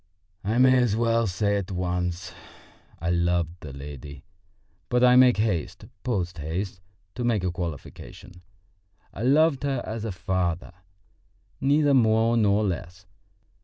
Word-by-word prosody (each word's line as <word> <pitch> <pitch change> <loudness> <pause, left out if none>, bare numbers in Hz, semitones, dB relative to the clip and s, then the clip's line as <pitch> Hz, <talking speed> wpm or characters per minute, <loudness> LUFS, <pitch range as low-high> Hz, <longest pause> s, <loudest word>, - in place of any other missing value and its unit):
I 110 +4 -1
may 130 0 +5
as 115 -4 +1
well 115 0 +1
say 100 +3 0
at 100 -3 -4
once, 90 0 -3 0.7
I 85 +2 -1
loved 85 -1 0
the 75 - -9
lady, 70 0 -9 0.7
but 125 0 +2
I 125 0 +6
make 125 -2 +6
haste 105 -7 -2 0.2
post 90 -9 -2
haste 90 +5 -4 0.3
to 125 - -4
make 115 -5 +1
a 90 - 0
qualification. 90 +1 -8 0.7
I - - -7
loved 140 +3 +3
her 135 -3 -1
as 110 0 -5
a 110 - -3
father, 90 -1 -2 0.9
neither 145 +1 +3
more 115 -2 +3
nor 105 -2 +3
less. 90 -1 -4
100 Hz, 135 wpm, -25 LUFS, 90-120 Hz, 0.9 s, I